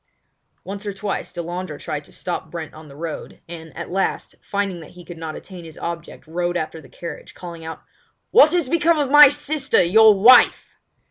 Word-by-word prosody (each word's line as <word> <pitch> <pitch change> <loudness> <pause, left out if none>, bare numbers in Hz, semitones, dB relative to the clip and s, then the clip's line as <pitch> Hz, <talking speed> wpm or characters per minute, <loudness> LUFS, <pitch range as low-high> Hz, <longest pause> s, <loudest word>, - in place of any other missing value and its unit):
Once 200 +1 -7
or 200 - -3
twice 200 0 -4
Delandre 175 -2 -5
tried 150 0 -5
to - - -17
stop 175 -3 -5
Brent 160 -2 -7
on 155 0 -13
the 140 - -14
road, 160 +1 -7
and, 160 -1 -10
at 170 - -6
last, 190 +1 -2
finding 200 -3 -3
that 160 - -12
he 175 - -12
could 175 -2 -10
not 160 -1 -6
attain 185 -3 -10
his 160 -1 -12
object 170 0 -7
rode 175 +2 -2
after 160 0 -5
the 135 - -17
carriage, 170 - -9
calling 170 -2 -9
out: 160 0 -8 0.5
"What 300 - +7
has 345 -6 +1
become 335 +3 +2
of 285 -3 -1
my 295 -1 +10
sister, 290 -6 0
your 215 +3 +5
wife?" 245 +5 +6
175 Hz, 195 wpm, -21 LUFS, 165-215 Hz, 0.5 s, my